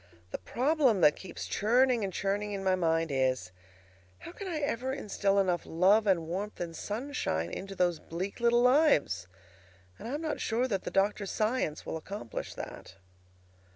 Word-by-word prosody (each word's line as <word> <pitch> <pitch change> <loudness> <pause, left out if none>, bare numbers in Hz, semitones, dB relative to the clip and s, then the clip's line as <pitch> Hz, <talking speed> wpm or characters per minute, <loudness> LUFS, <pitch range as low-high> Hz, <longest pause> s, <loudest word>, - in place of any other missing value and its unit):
The - - -4
problem 260 - +2
that 150 -2 +6
keeps 190 - -7
churning 240 +2 +2
and 195 - -2
churning 205 +2 -1
in 195 -1 -4
my 190 -1 +3
mind 165 -3 +1
is: 130 -8 0 0.7
How - - -10
can 390 +2 -7
I 340 -4 -2
ever 265 -3 -1
instil 205 -6 0
enough 180 -3 +2
love 195 +6 +3
and 175 -4 +3
warmth 195 +5 -4
and 170 -1 -4
sunshine 205 - -2
into 195 0 -6
those 175 -3 +1
bleak 185 +7 -5
little 240 0 +4
lives? 250 - +3 0.7
And - - -7
I 260 - -2
am 300 - -4
not 310 -2 -2
sure 240 +3 +1
that 195 -6 -2
the - - -1
doctor's 200 0 +1
science 215 -8 -1
will - - -3
accomplish 160 - -6
that. 95 - -8
200 Hz, 170 wpm, -30 LUFS, 170-245 Hz, 0.7 s, that